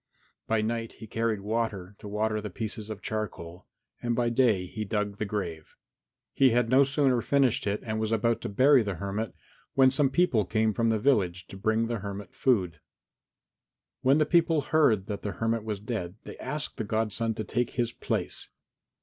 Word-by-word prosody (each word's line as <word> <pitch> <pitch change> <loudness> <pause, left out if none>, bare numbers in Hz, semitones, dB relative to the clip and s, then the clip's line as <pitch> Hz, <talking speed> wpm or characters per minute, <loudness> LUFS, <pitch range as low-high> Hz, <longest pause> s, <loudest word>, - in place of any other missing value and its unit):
By 110 -1 +1
night 115 0 -2
he 110 - -11
carried 110 -1 -1
water 105 -3 -2
to 105 - -9
water 110 +1 -1
the 105 - -5
pieces 110 +2 -5
of 105 -2 -7
charcoal, 90 -5 -5 0.3
and 120 -1 0
by 120 0 +1
day 115 -7 +3
he 110 +4 -5
dug 105 -1 -2
the 105 - 0
grave. 85 -7 -4 0.6
He 135 - +5
had 120 -1 +2
no 130 +3 +6
sooner 135 -3 +2
finished 135 -6 +2
it 100 +1 -1
and 110 -3 -2
was 110 0 -1
about 115 +1 +1
to - - -4
bury 130 +6 +5
the 100 -3 -2
hermit, 100 +3 -4 0.4
when 130 -1 +6
some 135 0 +2
people 135 -8 +2
came 110 +2 +1
from 115 +2 +1
the 110 - +2
village 95 -8 +1
to - - -9
bring 110 +3 +1
the 115 -1 -2
hermit 100 -1 -7
food. 95 - +1 1.2
When 135 +3 +4
the 155 - +3
people 165 -1 +3
heard 125 -10 +3
that 100 -1 -5
the 105 - -3
hermit 115 +2 -1
was 105 -2 -3
dead 105 -4 -4
they - - -9
asked 150 +3 -3
the 115 - -2
godson 110 +1 -1
to 110 - -3
take 120 +4 -1
his 120 -1 0
place. - - -3
110 Hz, 190 wpm, -28 LUFS, 105-120 Hz, 1.2 s, no